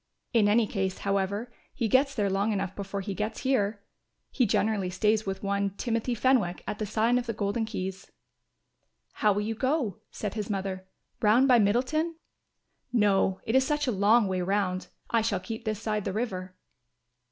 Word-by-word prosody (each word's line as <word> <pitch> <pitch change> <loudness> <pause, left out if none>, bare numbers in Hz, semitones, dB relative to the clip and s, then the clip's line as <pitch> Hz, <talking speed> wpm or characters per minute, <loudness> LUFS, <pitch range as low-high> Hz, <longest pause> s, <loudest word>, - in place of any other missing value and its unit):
In 220 -3 +4
any 220 +2 +4
case, 190 -2 -2
however, 200 +4 -1 0.2
he 235 - 0
gets 270 +5 +3
there 205 -4 +1
long 200 +3 +1
enough 195 -2 -2
before 200 0 -4
he 195 +1 -4
gets 215 +3 -3
here. 210 -6 0 0.5
He 250 -4 +2
generally 200 -2 +1
stays 215 +3 +1
with 190 0 -3
one, 200 0 -1
Timothy 230 +2 -1
Fenwick, 230 -8 +2
at 210 - -4
the 215 - -2
sign 225 +4 +2
of 245 - -6
the 230 - -1
Golden 210 +2 -1
Keys." 190 -3 -5 1.1
"How 210 - +5
will 205 +1 0
you 220 +2 -2
go," 260 - -1
said 210 -3 -4
his 210 -1 -4
mother, 190 -2 -3 0.3
"round 230 +5 +5
by 250 -3 +6
Middleton?" 255 +11 +1 0.8
"No, 200 -4 +2
it 225 - -2
is 265 - +6
such 295 +1 0
a 250 - +1
long 210 +2 +4
way 185 -1 -1
round; 185 0 0 0.2
I 230 - +3
shall 215 -4 0
keep 220 +5 -7
this 215 -2 -1
side 215 -2 -2
the 190 - -3
river." 185 -5 -3
210 Hz, 180 wpm, -28 LUFS, 195-230 Hz, 1.1 s, by